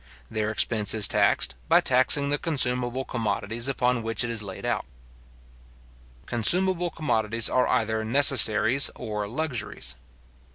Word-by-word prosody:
Their 110 -1 -2
expense 110 -1 0
is 105 -3 +5
taxed, 65 - +1 0.2
by - - +6
taxing 130 +3 +2
the 145 - 0
consumable 125 -4 -1
commodities 115 +1 -3
upon 125 -2 0
which 115 +2 -1
it 120 - -3
is 115 -2 -3
laid 95 -2 -9
out. - - -1 1.4
Consumable 180 - -1
commodities 115 -8 -1
are 130 - +1
either 110 0 -1
necessaries 130 0 +5
or 105 -3 -5
luxuries. 115 - -4
120 Hz, 125 wpm, -25 LUFS, 110-135 Hz, 1.4 s, by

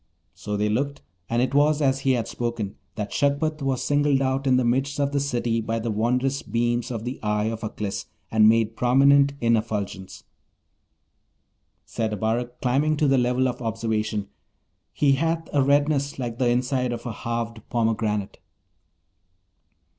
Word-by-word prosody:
So 105 +4 -4
they 105 +1 +1
looked, 140 - -2 0.3
and 120 +1 +2
it 130 - -1
was 145 +1 +3
as 135 -2 +2
he 135 -1 +2
had 120 -3 -1
spoken, 115 -4 -3 0.2
that 105 -2 -4
Shagpat 145 +2 0
was 135 -2 -1
singled 145 -1 +2
out 135 +1 0
in 130 -1 +4
the 130 - +1
midst 135 +4 0
of 140 0 +1
the 145 - +1
city 120 -4 -1
by 115 +1 -2
the 115 0 -2
wondrous 125 +5 0
beams 120 +2 -1
of 115 -3 -4
the 125 +2 -4
eye 105 +1 0
of 110 -1 -6
Aklis, 105 -2 -4 0.2
and 110 -1 +6
made 115 0 +2
prominent 140 +3 +4
in 115 0 +4
effulgence. 105 -4 -4 1.6
Said 110 -2 -2
Abarak, 115 +4 -2
climbing 145 +5 +2
to 150 - +2
the 135 -1 +4
level 125 +1 +2
of 125 0 -4
observation, 110 -2 -2 0.6
'He 145 -2 +2
hath 165 +4 0
a 145 - +3
redness 145 +1 +2
like 120 -3 -4
the 125 -2 +3
inside 125 0 0
of 120 0 -7
a 120 - -3
halved 115 0 -4
pomegranate.' 110 -3 -1
120 Hz, 160 wpm, -24 LUFS, 110-135 Hz, 1.6 s, and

